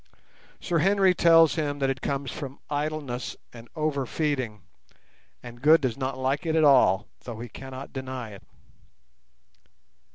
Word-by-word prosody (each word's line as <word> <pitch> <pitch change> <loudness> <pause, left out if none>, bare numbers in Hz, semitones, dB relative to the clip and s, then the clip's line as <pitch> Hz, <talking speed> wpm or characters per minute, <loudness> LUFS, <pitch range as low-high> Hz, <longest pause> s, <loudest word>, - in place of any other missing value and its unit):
Sir 170 -2 0
Henry 195 +2 +4
tells 165 -2 +5
him 145 -3 -2
that 135 -1 +1
it 130 -1 -6
comes 140 -1 -3
from 135 -1 -7
idleness 145 -4 -3 0.2
and 115 -1 -12
over 150 -4 -1
feeding, 130 - -2 0.8
and 120 -1 -11
Good 155 +4 +6
does 130 -5 -1
not 130 -1 -3
like 135 +2 -1
it 160 -2 -1
at 160 - +4
all, 120 -8 +5
though 115 -3 -8
he 120 +1 -7
cannot 130 +3 -9
deny 130 -4 -6
it. 100 - -12
135 Hz, 150 wpm, -26 LUFS, 125-155 Hz, 0.8 s, Good